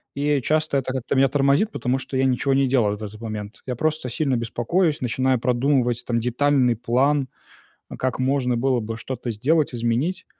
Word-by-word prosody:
И, 145 +1 -1
э, - - -2
часто 155 +2 +1
это 130 -1 -4
как-то 130 +1 -2
меня 135 +1 +5
тормозит, 140 - +2
потому 125 +2 -1
что 130 0 -5
я 135 - +2
ничего 130 +1 +1
не 135 -1 +3
делаю 120 -6 +2
вот 105 - -8
в - - -4
этот 105 +2 -10
момент. 105 -1 -6
Я 125 - -2
просто 155 0 -1
сильно 135 +1 0
беспокоюсь, 145 +8 0
начинаю 130 +1 +1
продумывать 125 -1 +1
там 115 -1 0
детальный 125 +1 +2
план, 130 +4 +1 0.6
э, - - -7
как 130 0 -2
можно 130 -2 +1
было 130 0 +1
бы 110 0 -5
что-то 125 0 -5
сделать, 145 +8 +1
изменить. 120 +11 -1
130 Hz, 195 wpm, -23 LUFS, 120-140 Hz, 0.6 s, меня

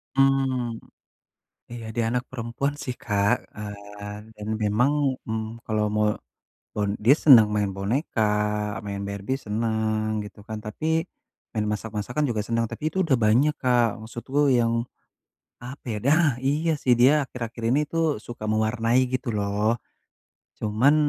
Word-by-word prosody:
Mmm, 135 -4 +2 0.9
iya 120 -1 -7
dia 115 - +1
anak 125 +1 0
perempuan 125 +3 -2
sih 125 -2 -4
Kak 105 -1 +2 0.6
kan, 105 0 -7
dan 105 0 -8 0.2
memang, 110 +7 +3 0.4
mmm, 110 +1 -4
kalau 110 -1 +1
me 105 - +2 0.7
bon 105 -1 0
dia 130 +6 +7
senang 120 -10 +8
main 105 -1 +1
boneka, 110 +6 -1 0.6
main 100 -1 -4
Barbie 100 +6 -3
seneng 110 0 0
gitu 105 +1 -11
kan, 110 -1 -4
tapi 105 +8 -6 0.7
main 110 -2 -1
masak-masakan 110 +6 -2
juga 110 -3 0
senang 115 0 0
tapi - - -8
itu - - -4
udah 150 -7 +2
banyak 130 +8 +4
Kak 120 -3 +3
maksudku 135 +5 0
yang 115 -2 +3 0.9
apa 125 +3 -9
ya, - - -2
nah! 155 +5 +4 0.2
Iya 150 +5 +1
sih 125 - +4
dia 130 +4 +7
akhir-akhir 120 -3 -6
ini 135 +4 +3
tuh 165 -4 +1
suka 120 -2 -7
mewarnai 115 +3 +2
gitu 130 +1 -2
loh. 105 +3 +1 0.8
Cuman, 110 +7 +3
115 Hz, 140 wpm, -25 LUFS, 105-130 Hz, 0.9 s, senang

